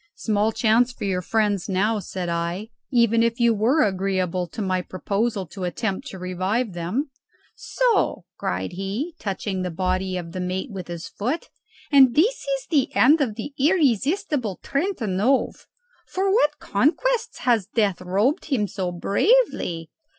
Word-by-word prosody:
"Small 215 0 +1
chance 225 +3 +3
for - - -9
your 190 -2 0
friends 205 0 0
now," 210 +3 +1
said 185 -1 -5
I, 170 +5 -2 0.2
"even 235 -3 +3
if 230 +1 +1
you 235 -1 +4
were 235 +9 +3
agreeable 185 -2 0
to 170 - -10
my 185 -3 0
proposal 200 +3 -2
to 190 +2 -7
attempt 190 +2 -2
to 190 - -8
revive 185 +5 -1
them." 185 - -2 0.4
"So!" - - 0
cried - - -3
he, 195 - -4
touching 195 -1 -3
the 180 - -2
body 185 +2 -1
of 170 -2 -6
the 185 - -5
mate 185 +6 -3
with 185 -3 -6
his 170 0 -6
foot; 255 +11 -3 0.4
"and 265 -4 +6
this 420 +11 +3
is - - -1
the 285 -5 +2
end 295 +5 +5
of 230 -7 0
the 235 +6 -6
irresistible 280 - +1
Trentanove! 265 - 0 0.4
for 385 +1 0
what 300 -9 +3
conquests 355 - 0
has 235 -6 +2
Death 205 -6 0
robed 205 - +1
him 245 -9 0
so 185 -2 -3
bravely? 185 - +1
210 Hz, 150 wpm, -23 LUFS, 185-270 Hz, 0.4 s, and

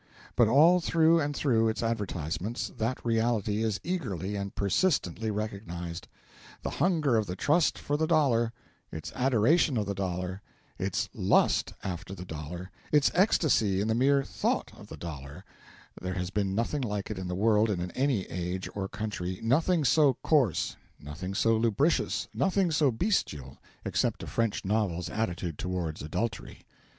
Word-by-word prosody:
But 120 - +5
all 160 +9 +6
through 165 0 +4
and 145 0 -2
through 115 -6 +2
its 110 - -2
advertisements 100 -2 -2
that 115 +3 -2
reality 110 -2 +1
is 110 -3 0
eagerly 105 - -3
and 100 0 -4
persistently 110 - +1
recognised. 100 -5 -5 0.6
The - - -2
hunger 155 -9 +3
of 110 -2 0
the 90 - -4
Trust 150 - +2
for 145 - -2
the 160 +1 +1
Dollar, 130 -8 +3 0.4
its 80 0 -6
adoration 130 +3 +3
of 105 - 0
the 100 - -2
Dollar, 90 0 -3 0.4
its - - -1
lust - - +2
after 90 0 -5
the 90 - -8
Dollar, 85 +3 -7 0.2
its 150 -2 +4
ecstasy 150 - +3
in 105 - 0
the 110 - +2
mere 135 +4 +3
thought - - -1
of - - -13
the - - -9
Dollar 70 -4 -8 0.6
there 90 0 -3
has 90 0 -3
been 100 -2 -1
nothing 120 +6 -1
like 105 -4 -3
it 100 - -4
in 95 - -4
the 90 - -3
world 110 +2 +3
in 90 -3 -2
any 130 -7 +1
age 90 +2 -4
or 95 -2 -3
country, 95 -4 -4
nothing 155 +7 +2
so 140 +1 +4
coarse, 135 - +2 0.2
nothing 85 +7 -6
so 115 +1 +3
lubricous, 115 +8 +1
nothing 190 -2 +1
so 150 -2 +3
bestial, 110 - -1 0.3
except - - 0
a - - -4
French 115 -4 -1
novel's 95 -4 0
attitude 90 -7 -3
towards 90 -4 -3
adultery. 110 +10 -4
110 Hz, 160 wpm, -29 LUFS, 90-135 Hz, 0.6 s, all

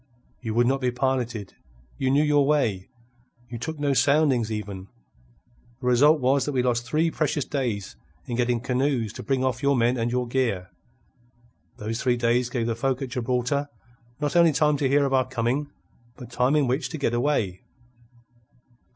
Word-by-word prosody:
You 110 -3 -4
would 120 +1 +4
not 135 +2 +1
be 125 - +1
piloted. 125 -4 -2 0.5
You 130 - +1
knew 140 +3 +3
your 145 -1 +3
way. 115 -11 0 0.6
You 120 - -5
took 160 +6 -5
no 145 -1 0
soundings 135 -5 +2
even. 100 -3 -5 0.9
The 130 - -8
result 145 +6 +5
was 130 +1 +2
that 145 - -3
we 125 -2 +1
lost 120 -1 0
three 160 +5 +1
precious 145 -3 -1
days 110 - -3 0.3
in 120 - -4
getting 120 -1 0
canoes 125 -3 -1
to - - -7
bring 135 -1 -1
off 130 -1 -1
your 140 -1 +2
men 120 +2 +2
and 115 0 0
your 125 0 -1
gear. 115 -8 -1 1.1
Those 110 +2 -4
three 125 -1 +1
days 120 +1 +1
gave 120 -2 -2
the 115 - 0
folk 130 +2 -1
at 130 - -5
Gibraltar 125 +4 -1 0.5
not 145 0 -2
only 170 -2 +5
time 150 +1 +3
to 140 -2 0
hear 140 +1 +3
of 135 - -1
our 130 -1 +2
coming, 130 +3 -1 0.5
but 125 -1 -11
time 125 +4 +2
in 150 -2 +3
which 130 +5 -1
to 160 - -5
get 140 -5 -1
away. 120 -8 0
125 Hz, 180 wpm, -25 LUFS, 120-140 Hz, 1.1 s, result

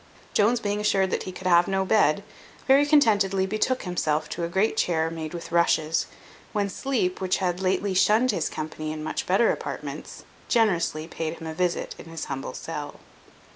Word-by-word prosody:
Jones 230 +4 +3
being 205 -1 -2
assured 195 -3 +2
that - - 0
he - - -5
could 185 +1 -11
have 175 -1 +5
no 190 0 0
bed, 200 -3 +3 0.4
very 275 +2 +5
contentedly 205 -10 +3
betook 215 +6 0
himself 155 -4 -1
to 170 - -4
a - - 0
great 190 +6 +1
chair 165 -5 +1
made 160 -2 -5
with 170 -1 -7
rushes, 165 -2 +2 0.5
when 205 -1 0
sleep, 205 -6 -1
which 185 -1 +1
had 180 -2 -1
lately 190 +1 0
shunned 215 +6 +4
his 175 -6 -1
company 155 0 -5
in 155 0 -5
much - - -3
better 195 +6 +4
apartments, - - -6 0.2
generously 175 -9 +1
paid 160 -1 -4
him 165 - -9
a 160 - -4
visit 175 +1 -1
in - - -10
his 165 -1 -6
humble 135 -2 -5
cell. 150 -3 -6
185 Hz, 180 wpm, -25 LUFS, 165-205 Hz, 0.5 s, have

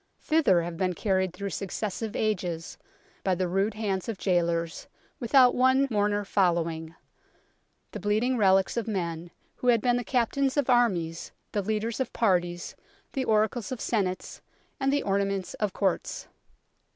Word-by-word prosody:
Thither 290 - +3
have 170 0 -5
been 185 -1 0
carried 190 -2 0
through 195 +2 -5
suc 195 - -4
cessive 215 +2 -4
ages, 180 -6 -2 0.5
by 190 -1 +2
the 185 +1 -1
rude 195 +4 0
hands 200 -2 -2
of 220 - -3
gaolers, 170 -3 0 0.3
without 250 +1 +5
one 260 +2 +4
mourner 205 -1 +1
following, 165 -4 0 1.0
the - - -6
bleeding 215 +6 +1
relics 195 -1 +3
of 230 - -1
men, 170 -5 -3 0.3
who 250 - -4
had 235 -2 +5
been 245 +2 +2
the 245 - -2
captains 260 +3 0
of 275 -3 +2
armies, 180 -10 +1 0.2
the 205 - 0
leaders 220 +2 -2
of 260 - -2
parties, 175 -5 0 0.4
the 265 -2 -1
oracles 220 +1 +1
of 255 - -4
senates, 190 -6 -2 0.4
and 270 0 +1
the 285 - +1
ornaments 195 -1 -1
of 210 -2 0
Courts." 190 -1 -2
200 Hz, 150 wpm, -27 LUFS, 180-235 Hz, 1.0 s, without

